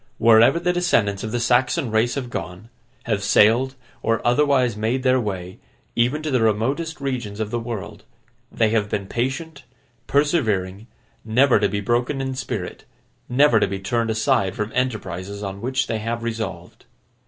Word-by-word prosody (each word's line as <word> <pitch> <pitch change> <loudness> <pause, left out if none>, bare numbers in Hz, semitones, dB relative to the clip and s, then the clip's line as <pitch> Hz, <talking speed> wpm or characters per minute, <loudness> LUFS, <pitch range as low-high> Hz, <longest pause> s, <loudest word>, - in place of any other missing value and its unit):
Wherever 115 +7 +5
the 180 +1 0
descendants 110 - +1
of 110 - -4
the 120 - -1
Saxon 120 0 +1
race 110 +2 +1
have 125 -4 -4
gone, 90 +5 -6 0.3
have 105 -3 -1
sailed, 115 +6 +3 0.3
or 115 0 +1
otherwise 125 -2 +3
made 115 +5 -1
their 130 0 +3
way, 95 -5 -5 0.4
even 125 +6 +1
to 155 - -2
the 130 -3 +2
remotest 130 +10 0
regions 125 -7 -4
of 110 -1 -3
the 120 - -1
world, 115 -4 -6 0.5
they 110 -2 +2
have 105 -2 0
been 100 - -2
patient, 140 - -3 0.4
persevering, 110 - 0 0.4
never 120 +2 +3
to 100 -1 +2
be 100 +1 -2
broken 120 +6 0
in 130 0 -2
spirit, 130 0 -5 0.5
never 125 -2 +4
to - - +2
be 95 0 -3
turned 115 +4 -1
aside 110 -3 +1
from 105 +1 -3
enterprises 100 -5 -3
on 100 0 -5
which 130 +2 0
they 110 -2 -2
have 115 +2 -3
resolved. 110 -7 -5
115 Hz, 165 wpm, -22 LUFS, 105-130 Hz, 0.5 s, Wherever